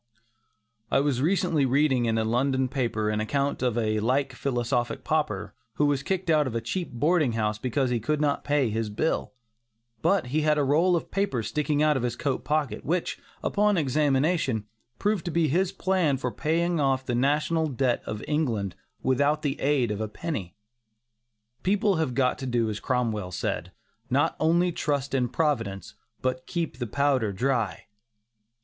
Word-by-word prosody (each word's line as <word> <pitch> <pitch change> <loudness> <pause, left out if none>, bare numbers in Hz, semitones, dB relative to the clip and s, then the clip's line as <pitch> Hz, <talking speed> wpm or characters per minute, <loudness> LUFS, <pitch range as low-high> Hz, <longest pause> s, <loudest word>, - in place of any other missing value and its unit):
I - - +3
was 140 -3 +1
recently 170 -2 +2
reading 135 -1 +2
in 115 -1 +1
a 110 - +1
London 130 +3 +1
paper 115 -5 -1
an 105 - -1
account 140 +6 -1
of 125 -3 0
a 110 -2 +1
like 130 +5 +1
philosophic 120 -2 -1
pauper 155 -1 -1 0.2
who 150 - +2
was 145 -2 +1
kicked 185 +4 -2
out 150 -3 +3
of 120 - -4
a - - +1
cheap 175 +7 -4
boarding 150 +1 +2
house 105 -1 -1
because 130 +2 0
he 120 - +1
could 150 +7 -1
not 145 -2 +1
pay 145 -5 +1
his 110 0 -1
bill, 130 +9 -1 0.7
but 195 -7 +2
he 155 - +3
had 150 0 +2
a 145 - +2
roll 165 +6 +3
of 170 - -3
papers 160 - -1
sticking 150 -1 +1
out 150 -2 +3
of - - -2
his 120 -1 -1
coat 135 0 -2
pocket, 150 +1 -1
which, 170 +3 -1 0.2
upon 205 -1 +2
examination, 140 - +1 0.3
proved 210 -3 0
to - - -1
be 165 -2 +1
his 180 +5 +1
plan 185 -7 +1
for 125 -1 -2
paying 165 +7 0
off 135 -2 +1
the 125 - -2
national 150 +5 +1
debt 130 -3 0
of 105 0 -4
England 115 - -1 0.3
without 145 +4 +2
the 140 -2 -2
aid 135 -5 +2
of 105 +1 -3
a 110 - -1
penny. 110 - -5 1.1
People 200 0 +2
have 155 -6 -1
got 125 -1 +1
to 135 - -4
do 120 -3 +1
as 105 - -5
Cromwell 110 -6 -1
said: - - -3 0.4
"not - - +2
only 170 +3 +3
trust 140 -4 -2
in 125 -2 +1
Providence, 135 -12 -1 0.3
but 130 0 -1
keep 170 -6 -3
the 120 - -2
powder 135 -3 +1
dry." 115 -4 -1
135 Hz, 175 wpm, -26 LUFS, 120-155 Hz, 1.1 s, I